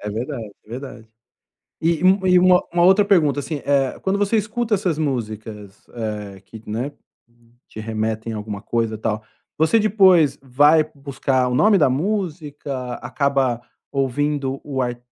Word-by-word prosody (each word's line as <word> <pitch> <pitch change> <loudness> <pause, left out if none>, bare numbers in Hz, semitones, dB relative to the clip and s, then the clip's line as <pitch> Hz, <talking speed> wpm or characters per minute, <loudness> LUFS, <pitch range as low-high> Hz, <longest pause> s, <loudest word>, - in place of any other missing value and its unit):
É 105 - -5
verdade, 115 0 -5
é - - -26
verdade. 120 -2 -8 0.7
E 165 +1 +2
e - - -6
um 190 0 +4
e 180 0 +6
uma 180 0 +5 0.2
outra 190 +3 +5
pergunta, 155 -8 +3
assim, 145 0 -4
eh, 140 -2 +1
quando 195 +1 0
você 205 +2 +1
escuta 220 +1 -1
essas 180 -6 -1
músicas, 110 -7 -5
eh 105 -4 -5
,que 110 +2 -13
né, 120 +7 -3 0.8
te 110 - -10
remetem 110 +1 -3
a - - -4
alguma 105 -1 -6
coisa 115 -2 -1
tal, 110 0 -2 0.3
você 160 +9 +3
depois 190 -7 +4
vai 145 +4 +4
buscar 135 -2 -1
o 125 - -1
nome 210 +6 +5
da 145 -6 +4
música? 145 - -3
Acaba 130 -1 0 0.3
ouvindo 140 0 -1
o 135 -3 -3
ar 120 -1 -3
135 Hz, 155 wpm, -21 LUFS, 115-170 Hz, 0.8 s, e